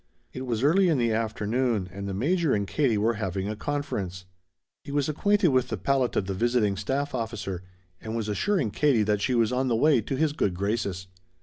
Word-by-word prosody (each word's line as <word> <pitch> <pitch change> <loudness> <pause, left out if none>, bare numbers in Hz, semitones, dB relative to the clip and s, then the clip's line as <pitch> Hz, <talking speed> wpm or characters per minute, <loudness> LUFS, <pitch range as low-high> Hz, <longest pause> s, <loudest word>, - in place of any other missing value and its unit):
It 130 0 -6
was 120 0 -1
early 180 +6 +4
in 155 - +2
the 120 -2 +1
afternoon 110 -1 0
and 100 0 -5
the - - -3
Major 155 - +1
and 100 -1 -1
Katie 130 -5 +1
were 110 +3 +2
having 95 0 -2
a 105 - -3
conference. 105 - -4 0.6
He - - -8
was 145 -1 +1
acquainted 200 +5 +2
with 130 -2 +2
the - - -3
palate 135 -3 0
of 95 - +1
the 95 - -3
visiting 115 -1 +1
staff 135 +8 -2
officer, 110 -6 -4 0.4
and 110 0 -5
was 115 -2 -2
assuring 140 - 0
Katie 135 -5 +3
that 105 -1 0
she 125 - +1
was 115 -1 +2
on 130 +1 0
the 120 - +2
way 140 +1 +4
to 135 - -3
his 150 +2 +1
good 100 - 0
graces. 100 -1 -2
115 Hz, 210 wpm, -26 LUFS, 105-140 Hz, 0.6 s, early